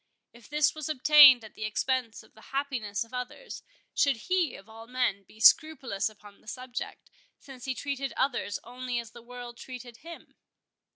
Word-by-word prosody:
If 235 -2 -17
this 300 +1 +2
was 310 -1 -5
obtained 290 -3 +8
at 220 - -12
the - - -7
expense 230 +2 -1
of - - -23
the 220 - -17
happiness 255 -8 -2
of 230 +2 -20
others, 250 - -6 0.3
should 280 -2 +3
he 345 +7 0
of 195 - -13
all 225 +1 -12
men 250 -5 0
be 215 - -18
scrupulous 260 -5 +4
upon 205 -1 -17
the - - -26
subject, 250 +1 -7 0.3
since 265 -3 -12
he 260 -1 -2
treated 275 +1 -3
others 250 -8 0
only 250 +1 -5
as 230 -1 -5
the 240 - -13
world 245 0 -10
treated 250 -2 -10
him? 335 +2 -12
250 Hz, 175 wpm, -28 LUFS, 225-275 Hz, 0.3 s, obtained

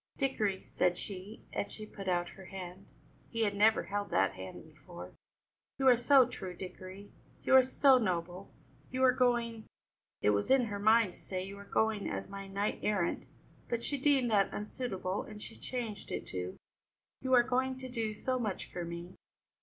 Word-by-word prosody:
"Dickory," 215 -8 0
said 180 -1 +3
she, 200 +3 -7
and - - -2
she 215 - -7
put 200 -2 -9
out 175 -1 +1
her 190 - -12
hand 185 0 -8 0.4
he 230 0 0
had 205 -2 +1
never 215 +2 +4
held 205 +3 -3
that 95 0 +2
hand 95 -1 -8
before 90 +1 -11 0.6
"you 270 -1 +2
are 250 - +9
so 255 +1 +6
true, 185 -7 -7
Dickory, 185 +2 -9 0.3
you - - +2
are 260 - +10
so 260 +1 +5
noble; 180 -2 -2 0.4
you 260 +1 -1
are 255 - +7
going 235 -3 +1 0.3
" - - -62
it 105 - +5
was 100 0 0
in 265 -2 +5
her 205 -2 -4
mind 220 -2 +4
to - - -18
say 185 -1 -4
"you 195 +1 -7
are 200 - -10
going 220 -1 +1
as - - -4
my 195 0 -7
knight 200 +2 -1
errant," 190 -5 0 0.4
but 235 0 -1
she 285 - -1
deemed 270 -3 +3
that 200 -2 +3
unsuitable, 205 -3 -3
and 210 -1 -9
she 225 - -9
changed 235 -5 -5
it - - -3
to 90 0 -5 0.6
"you 260 0 0
are 240 - +7
going 260 +1 0
to 260 0 -7
do 225 -4 -2
so 255 +4 -1
much 210 -5 -3
for 175 - -3
me." 170 +1 -6
210 Hz, 190 wpm, -32 LUFS, 185-245 Hz, 0.6 s, are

